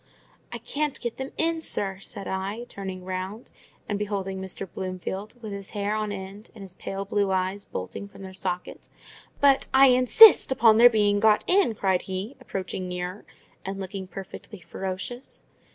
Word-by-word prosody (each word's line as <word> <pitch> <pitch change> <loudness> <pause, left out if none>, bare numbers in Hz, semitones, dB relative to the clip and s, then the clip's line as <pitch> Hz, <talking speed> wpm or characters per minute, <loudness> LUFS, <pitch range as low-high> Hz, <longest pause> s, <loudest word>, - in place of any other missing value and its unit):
"I 240 - -4
can't 285 +5 -2
get 235 -1 -4
them 265 0 -5
in, 330 0 +1
sir," 195 -10 -2
said 195 0 -9
I, 195 +5 -3
turning 190 -2 -7
round, 190 +5 -5 0.4
and 205 -1 -2
beholding 195 -2 -3
Mr. 190 +1 -6
Bloomfield, 190 +3 -5
with 215 - -5
his 200 -1 -6
hair 205 +1 0
on 215 -1 -2
end, 200 +2 -8
and 205 - -9
his 190 -2 -9
pale 195 +1 -5
blue 200 0 0
eyes 190 +1 -1
bolting 95 - -6
from 200 - -13
their 190 -1 -8
sockets. 185 -1 -5 0.5
"But 275 -1 +5
I 270 0 +8
INSIST 255 - +8
upon 225 -4 +5
their 240 +1 +10
being 205 -3 +2
got 215 0 +4
in!" 365 - +3
cried 190 -3 +1
he, 190 +7 -5
approaching 185 -5 -4
nearer, 180 +2 -5 0.4
and 195 +1 -5
looking 190 0 -6
perfectly 195 +2 -9
ferocious. 190 +8 -6
200 Hz, 170 wpm, -26 LUFS, 190-225 Hz, 0.5 s, their